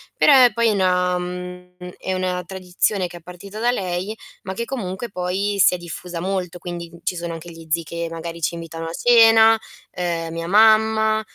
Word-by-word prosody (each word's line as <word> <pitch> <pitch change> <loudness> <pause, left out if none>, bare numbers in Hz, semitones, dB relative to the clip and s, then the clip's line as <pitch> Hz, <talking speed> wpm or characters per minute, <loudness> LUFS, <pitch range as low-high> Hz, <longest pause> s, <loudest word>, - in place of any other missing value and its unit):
però 290 - +5 0.2
poi 235 0 +2
è - - +3
una 180 -2 +1
mhmm, 180 0 -7 0.2
è 190 - -3
una 185 -1 -1
tradizione 185 +1 -1
che 175 - -11
è - - -11
partita 180 +5 -10
da 240 +1 +2
lei, 185 0 -3 0.3
ma 190 - -5
che 235 - -3
comunque 235 -3 -5
poi 195 +2 -2
si - - +6
è - - -1
diffusa 175 0 -7
molto, 185 -2 -3
quindi, 175 -1 -7
ci 180 - -2
sono 170 0 -4
anche 165 +1 -9
gli 165 -1 -13
zii 170 +2 +1
che, 170 +1 -5
magari, 165 0 -7
ci 165 - -1
invitano 165 -1 -7
a 165 - -5
cena, 225 -1 +6 0.3
ehm, 170 -2 -3
mia 165 0 -4
mamma. 220 +1 +4
180 Hz, 190 wpm, -21 LUFS, 170-205 Hz, 0.3 s, si